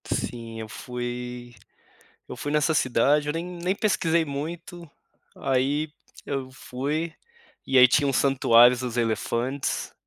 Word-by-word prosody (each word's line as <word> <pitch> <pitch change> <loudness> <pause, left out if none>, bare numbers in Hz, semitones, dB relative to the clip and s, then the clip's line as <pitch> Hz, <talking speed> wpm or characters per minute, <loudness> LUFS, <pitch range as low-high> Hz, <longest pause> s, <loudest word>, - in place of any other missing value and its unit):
Sim 115 -2 -4
eu 110 - -6
fui 120 +1 -6 0.8
eu - - -7
fui 145 - -4
nessa 150 +1 +2
cidade, 145 +3 +2
eu - - +1
nem 165 +2 -3
nem 180 +1 -2
pesquisei 170 -6 +1
muito, 165 +4 -6 0.5
aí 140 +3 0 0.3
eu 135 -2 -4
fui, 140 +5 -3 0.5
e 135 - +1
aí 125 - +10
tinha 145 +3 +3
um - - +1
santuários 125 -2 +5
dos 125 -2 -4
elefantes, 120 +3 -1
135 Hz, 130 wpm, -25 LUFS, 125-155 Hz, 0.8 s, aí